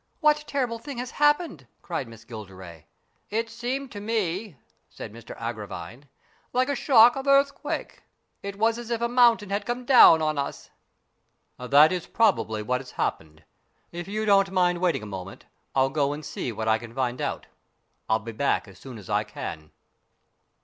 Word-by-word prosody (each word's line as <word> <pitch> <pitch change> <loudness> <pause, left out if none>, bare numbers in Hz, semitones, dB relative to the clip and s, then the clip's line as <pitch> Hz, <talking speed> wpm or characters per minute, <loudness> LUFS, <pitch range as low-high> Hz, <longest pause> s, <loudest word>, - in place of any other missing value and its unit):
What 300 -1 +3
terrible 245 -5 -2
thing 280 +1 -8
has 245 0 -5
happened? 295 - +1
" - - -44
cried 130 - -4
Miss 115 -1 -14
Gilderay. 95 -8 -10 0.2
" - - -43
It 225 +1 -3
appeared 255 +3 -3
to 205 - -7
me," 205 - -2 0.3
said - - -9
Mr 115 +1 -11
Agravine, 110 0 -7 0.2
" - - -37
like 255 +2 +2
a 285 - 0
shock 240 -2 +6
of 270 +1 -5
earthquake. 275 0 +1 0.4
It 200 0 -6
was 225 +2 +1
as 240 -1 -8
if 235 -1 -1
a 235 - 0
mountain 235 -4 +4
had 200 +1 -1
come 245 +1 -3
down 240 -10 +8
on 155 -2 0
us." 140 - -5 0.9
"That 140 +5 +5
is 180 -2 -3
probably 110 - +1
what 125 +4 -1
has 130 - -13
happened. 80 0 -3 0.5
If 175 0 -6
you 215 +2 -2
don't 195 -2 +4
mind 180 -2 +2
waiting 175 -10 0
a - - -6
moment, 95 -1 -8 0.3
I'll 135 0 +3
go 145 -1 +1
and 150 0 -8
see 145 -4 -4
what 110 0 -4
I 110 0 +3
can 115 +1 -11
find 125 -2 -1
out. - - -3 0.6
I'll 110 - +4
be 110 +2 -8
back 115 +1 0
as 95 -2 -15
soon 130 -1 -10
as 100 -4 -12
I - - +1
can." 75 -2 -7
170 Hz, 185 wpm, -26 LUFS, -, 0.9 s, down